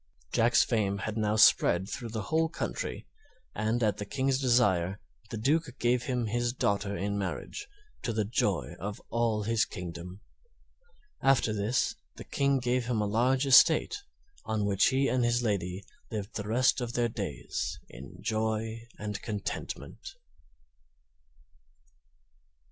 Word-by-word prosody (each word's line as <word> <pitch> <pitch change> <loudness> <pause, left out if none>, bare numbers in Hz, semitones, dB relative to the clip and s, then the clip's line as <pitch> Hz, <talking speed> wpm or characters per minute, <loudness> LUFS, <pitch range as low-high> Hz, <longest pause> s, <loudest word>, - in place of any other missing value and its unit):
Jack's 115 +1 +4
fame 100 -4 0
had 105 +2 -4
now 105 -1 +1
spread 95 -3 +5
through 115 +3 -5
the 110 -1 -4
whole 160 +6 +1
country, 170 - -4 0.5
and 110 +3 0
at 105 -2 +2
the - - -4
King's 135 +3 0
desire 105 -8 +2 0.3
the - - -4
Duke 140 +3 0
gave 120 +1 +1
him 125 -3 -1
his 120 +2 0
daughter 100 -4 0
in 100 +1 -2
marriage, 100 - -4 0.3
to 120 - -2
the 110 -2 0
joy 100 - 0
of 105 +2 -5
all 115 -2 +1
his 115 +1 +2
kingdom. 90 +1 -7 1.0
After 130 -5 +3
this 105 +4 0 0.2
the - - -9
King 140 0 +1
gave 125 -1 0
him 120 -3 0
a 105 - +1
large 125 +6 +2
estate, 155 - +6 0.5
on 110 -2 -1
which 100 -1 +3
he 135 +1 +2
and 125 -1 +1
his 120 +1 +2
lady 95 -3 -1 0.3
lived 105 -1 -5
the 105 -1 -4
rest 125 +4 +3
of 120 -1 -3
their 120 -1 +2
days 100 - -4
in 65 +2 -11
joy 110 +1 -2
and 105 -1 -4
contentment. 115 - -5
110 Hz, 145 wpm, -29 LUFS, 100-125 Hz, 1.0 s, estate